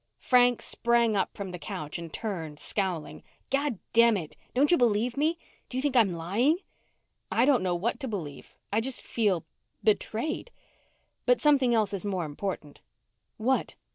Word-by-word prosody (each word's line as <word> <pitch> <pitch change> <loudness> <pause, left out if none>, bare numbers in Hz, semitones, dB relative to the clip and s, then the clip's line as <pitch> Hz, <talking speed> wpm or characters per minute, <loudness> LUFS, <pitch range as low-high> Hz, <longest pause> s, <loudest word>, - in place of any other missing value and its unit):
Frank 245 -1 +4
sprang 235 -2 +2
up 195 - -1
from 195 -2 -5
the 180 - -7
couch 150 +1 -5
and 165 -1 -8
turned, 165 -9 -4
scowling. 185 -6 -3 0.3
"Goddamn 235 -5 +3
it! 160 -5 -7 0.2
Don't 285 +5 +4
you - - +7
believe 235 0 +2
me? 310 +4 +1 0.3
Do 255 - -4
you - - +1
think 285 -3 0
I'm 225 -6 +5
lying?" 210 - +2 0.7
"I 235 - +4
don't 275 -4 +4
know 180 -1 0
what 205 +7 -1
to 270 - -4
believe. 165 - -6 0.2
I 220 - +3
just 260 +2 -3
feel 200 -8 0 0.4
betrayed. 225 - 0 0.8
But - - +5
something 270 -5 +4
else 215 -2 +1
is 195 - -3
more 190 -4 -1
important." 150 -1 -5 0.6
"What?" 255 +4 0
220 Hz, 160 wpm, -28 LUFS, 185-250 Hz, 0.8 s, you